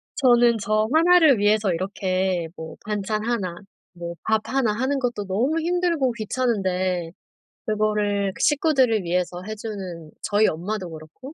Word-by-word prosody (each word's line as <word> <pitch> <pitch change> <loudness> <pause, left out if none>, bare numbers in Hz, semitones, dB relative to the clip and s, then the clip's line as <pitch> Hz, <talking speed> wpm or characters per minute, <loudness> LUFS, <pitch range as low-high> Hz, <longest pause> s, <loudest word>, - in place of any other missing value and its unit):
저는 240 -3 +4
저 215 +1 +1
1 350 +3 +6
를 300 -7 +5
위해서 205 -2 +2
이렇게 185 -1 -1
뭐 160 0 -8
반찬 210 0 -2
1 200 -8 -2 0.4
뭐 170 0 -7
밥 220 -1 +1
1 260 -5 +1
하는 260 +5 -1
것도 240 -5 -2
너무 255 +12 0
힘들고 340 -5 +1
귀찮은데 190 -7 -1 0.6
그거를 210 -2 0
그 - - -14
식구들을 265 - +3
위해서 180 +1 -2
해주는 195 -7 -6
저희 210 +1 +3
엄마도 185 +3 -3
그렇고 160 - -11
215 Hz, 265 characters per minute, -23 LUFS, 185-245 Hz, 0.6 s, 1